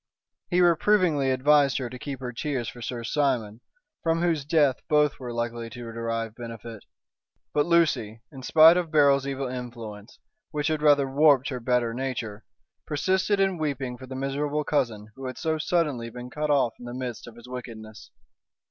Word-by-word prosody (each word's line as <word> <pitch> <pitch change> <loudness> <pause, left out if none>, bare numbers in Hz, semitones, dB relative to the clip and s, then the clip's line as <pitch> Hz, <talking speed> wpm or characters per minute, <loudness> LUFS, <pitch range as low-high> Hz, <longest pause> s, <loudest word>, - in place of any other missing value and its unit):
He 180 0 +3
reprovingly 170 -4 +3
advised 140 +1 +3
her 130 - -3
to 125 +1 -9
keep 135 -2 -6
her 125 -1 -4
tears 130 -2 -3
for 120 - -8
Sir 120 0 -4
Simon, 120 -5 -1 0.4
from 165 0 +1
whose 165 -5 +1
death 145 -4 +3
both 150 -1 +3
were 125 -2 -6
likely 120 0 -3
to 115 0 -8
derive 115 -1 -3
benefit. 115 -2 -9 0.7
But 150 +2 +2
Lucy, 155 -10 +2
in 135 - -10
spite 160 +6 +7
of 175 -2 -1
Beryl's 140 -3 +4
evil 135 -1 -3
influence, 120 -4 -8 0.3
which 150 0 -1
had 155 -1 -1
rather 145 -2 +4
warped 140 0 +4
her 130 -3 -4
better 120 -1 0
nature, 115 -4 -4 0.4
persisted 190 +6 +1
in 190 -3 +1
weeping 135 -5 -2
for 130 +1 -11
the 130 - -7
miserable 145 +3 -1
cousin 115 -9 -1
who 135 -1 -6
had 130 - -6
so 160 -1 -1
suddenly 150 -8 0
been 125 +1 -9
cut 150 +3 -2
off 140 -5 +3
in 120 - -10
the 120 0 -6
midst 125 -3 -5
of 120 - -11
his 120 +1 -13
wickedness. 110 -4 -9
130 Hz, 175 wpm, -26 LUFS, 120-150 Hz, 0.7 s, spite